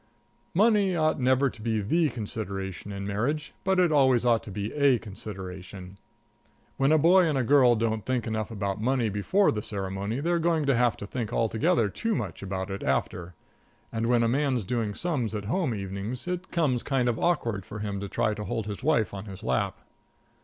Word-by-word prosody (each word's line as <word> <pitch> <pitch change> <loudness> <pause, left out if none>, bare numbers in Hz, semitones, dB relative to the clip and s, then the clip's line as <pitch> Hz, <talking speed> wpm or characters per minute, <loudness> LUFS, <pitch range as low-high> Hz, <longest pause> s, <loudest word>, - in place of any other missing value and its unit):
Money 205 -2 +4
ought 155 -2 +1
never 130 +2 +3
to 115 - -7
be 110 -1 0
the 155 - +2
consideration 100 -4 -5
in 100 0 -5
marriage, 130 +10 -2
but 190 -1 +2
it 175 -3 +4
always 130 -5 +4
ought 115 -2 +4
to - - -10
be 100 +2 -4
a 140 -4 +4
consideration. 95 -3 -8 0.8
When 135 +2 +3
a 155 - +6
boy 175 +3 +5
and 150 -3 0
a 130 - +1
girl 125 -1 +5
don't 110 -1 -1
think 125 -3 -1
enough 110 -1 -2
about 100 -2 -3
money 125 -1 +1
before 105 - +2
the 105 - -2
ceremony, 100 +3 -3
they're 170 +3 +1
going 165 -2 +1
to 135 -2 +3
have 120 -1 +2
to - - -6
think 115 +1 -4
altogether 115 -1 +2
too 225 - -2
much - - -4
about 95 0 -4
it 95 - -4
after; 85 +6 -2 0.6
and 115 0 -1
when 120 -1 +3
a - - +3
man's 130 -1 +1
doing 110 -1 -2
sums 135 -11 -1
at 105 -1 -4
home 135 - 0
evenings, 100 - -5
it 180 +1 -3
comes 145 -8 +1
kind 135 -3 0
of 120 -2 0
awkward 115 - 0
for 105 - -8
him 105 -2 -3
to 100 0 -5
try 110 - 0
to 105 0 -5
hold 115 +1 -2
his 105 +1 -5
wife 135 -8 +1
on 100 0 -6
his 95 -2 -9
lap. 65 0 -1
115 Hz, 200 wpm, -27 LUFS, 100-140 Hz, 0.8 s, a